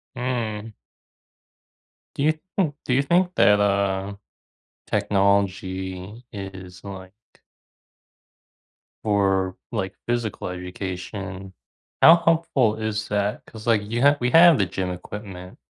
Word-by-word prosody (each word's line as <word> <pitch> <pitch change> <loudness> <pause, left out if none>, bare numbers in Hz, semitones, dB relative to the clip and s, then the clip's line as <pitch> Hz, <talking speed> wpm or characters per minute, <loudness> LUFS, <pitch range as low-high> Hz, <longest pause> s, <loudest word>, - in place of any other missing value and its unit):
Mm. 115 -4 -3 1.4
Do 140 - -1
you 155 +1 +4 0.2
think 160 -7 +1
do 125 - 0
you 135 - +4
think 180 +5 +2
that, 105 0 +5
uh, 100 -1 0 0.7
technology 95 +1 -1
is, 95 -2 -9
like 95 -1 -9 1.9
for, 95 -3 +1 0.2
like, 95 -4 -3
physical 120 -6 -2
education, 95 +1 -6 0.5
how 165 +2 +9
helpful 160 -9 +2
is 110 -1 -3
that? 105 0 -1
'Cause, 110 0 -11
like, 115 -3 +3
you 115 +3 -3
ha 145 +1 +5
we 125 - +1
have 170 -2 +8
the 100 - +2
gym 90 0 -3
equipment, 90 0 -8
100 Hz, 110 wpm, -23 LUFS, 95-120 Hz, 1.9 s, how